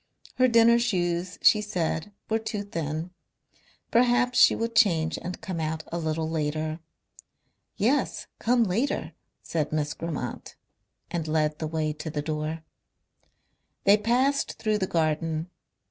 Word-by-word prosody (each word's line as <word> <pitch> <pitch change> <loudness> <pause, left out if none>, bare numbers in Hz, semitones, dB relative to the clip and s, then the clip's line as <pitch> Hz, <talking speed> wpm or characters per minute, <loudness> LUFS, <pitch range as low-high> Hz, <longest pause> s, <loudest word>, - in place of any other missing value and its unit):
Her 255 - +5
dinner 235 0 +5
shoes, 180 -5 -1
she 210 - +6
said, 185 -2 -2 0.2
were 220 0 +1
too 215 -2 -4
thin. 165 -3 -4 0.8
Perhaps 245 +1 +3
she - - +7
would 230 0 -3
change 165 -7 +3
and 180 +1 -5
come 180 -3 -4
out 160 0 -2
a 170 - -2
little 160 0 -1
later. 155 0 -2 1.0
"Yes, 250 +8 +1
come 240 +1 +3
later," 225 +8 -1 0.3
said 155 -3 -2
Miss 150 -1 -1
Grammont 155 -7 -5 0.6
and 165 -2 -2
led 155 -1 0
the 155 - -2
way 155 -1 -1
to 155 +1 -6
the 150 -1 -3
door. 155 +1 -3 1.2
They 200 +1 +7
passed 250 +6 +1
through 215 -1 -1
the 190 - 0
garden. 160 +1 -1
170 Hz, 135 wpm, -26 LUFS, 155-220 Hz, 1.2 s, she